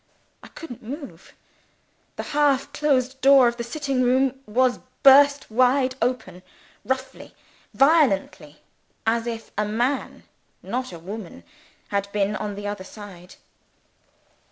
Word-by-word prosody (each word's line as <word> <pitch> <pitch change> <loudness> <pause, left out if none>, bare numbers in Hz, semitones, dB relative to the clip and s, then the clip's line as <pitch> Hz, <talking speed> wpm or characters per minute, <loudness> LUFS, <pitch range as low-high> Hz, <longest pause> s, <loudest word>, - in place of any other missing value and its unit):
I - - -13
couldn't 300 -8 -10
move. 275 +6 -9 0.8
The - - -5
half 285 -2 +1
closed 265 -3 0
door 270 -2 +7
of 235 0 -2
the 235 - -4
sitting 270 +1 -2
room 260 +1 +2
was 250 +3 +1 0.2
burst 280 -1 +6
wide 255 +2 +3
open 210 -8 -2 0.4
roughly, 260 +1 -5 0.4
violently, 245 - +2 0.4
as 230 +1 0
if 225 -1 -6
a 210 - +1
man, 240 +6 -2 0.4
not 255 -1 -4
a 170 - -8
woman, 190 +3 -9 0.5
had 200 0 -2
been 205 0 0
on 210 -1 -4
the 205 +1 -7
other 205 -2 -4
side. 185 -3 -12
245 Hz, 125 wpm, -23 LUFS, 210-270 Hz, 0.8 s, door